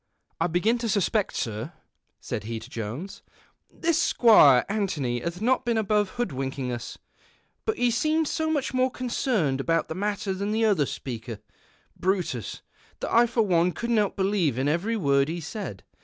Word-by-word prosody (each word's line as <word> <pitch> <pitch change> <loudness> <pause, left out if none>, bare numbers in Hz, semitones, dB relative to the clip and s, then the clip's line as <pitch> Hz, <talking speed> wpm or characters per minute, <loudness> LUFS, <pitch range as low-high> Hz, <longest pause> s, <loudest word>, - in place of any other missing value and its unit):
" - - -20
I - - +3
begin 200 +8 +1
to 230 -1 -2
suspect, 205 +1 +1
Sir,"' 115 +8 -3 0.5
said - - -5
he 115 +1 -4
to 115 +3 -12
Jones, 120 - -6 0.3
" - - -41
this 335 0 +3
Squire 210 - +6
Antony 165 - -1
hath 170 - -5
not 255 +2 +2
been 235 -2 0
above 210 -2 +1
hoodwinking 135 - -2
us, 120 -1 -6 0.7
but 440 -2 0
he 245 -1 +2
seemed 310 +6 +1
so 315 +1 -1
nuich 290 -5 -1
more 255 0 +2
concerned 235 - -1
about 165 +3 0
the - - -2
matter 200 +1 -2
than 200 +2 -2
the 225 +1 +2
other 185 -10 +2
speaker, 115 -3 -6 0.6
Brutus, 180 - -2 0.4
that - - -4
I 235 +1 +6
for 230 -1 +1
one 180 -3 +2
couldn't 235 -1 -1
help 205 -2 +1
believing 175 - +1
every 185 +10 0
word 140 -6 +2
he 170 +2 -3
said. 165 - -6
190 Hz, 170 wpm, -26 LUFS, 140-230 Hz, 0.7 s, Squire